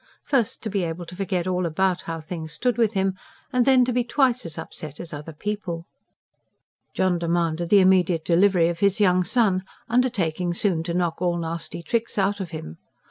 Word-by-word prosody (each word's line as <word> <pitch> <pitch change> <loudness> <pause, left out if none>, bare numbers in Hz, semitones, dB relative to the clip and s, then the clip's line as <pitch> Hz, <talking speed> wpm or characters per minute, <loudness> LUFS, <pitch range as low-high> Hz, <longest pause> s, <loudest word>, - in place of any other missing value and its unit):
First, 265 -7 0
to 220 - -2
be 200 -1 0
able 170 +1 -4
to 180 - -10
forget 185 -2 -1
all 185 -1 0
about 180 +3 +1
how 165 0 -3
things 160 0 -6
stood 245 -2 0
with 225 -2 +2
him, 190 0 +1 0.4
and 250 0 +2
then 260 -2 +6
to 250 - -1
be 245 0 +2
twice 255 - +1
as 160 - -6
upset 155 -2 -7
as 170 - -7
other 150 +2 -7
people. 175 -1 -4 1.1
John 185 -2 +2
demanded 170 0 0
the 200 0 +7
immediate 180 -3 +3
delivery 180 -1 +4
of 170 -1 -2
his 200 +2 +2
young 185 -3 +4
son, 195 -1 +2 0.3
undertaking 185 -9 0
soon 180 -4 +1
to 170 0 -2
knock 175 -1 -1
all 175 -1 +1
nasty 170 0 -4
tricks 230 +4 -2
out 200 +1 +1
of 190 -3 -4
him. 80 - -8
180 Hz, 190 wpm, -24 LUFS, 170-205 Hz, 1.1 s, the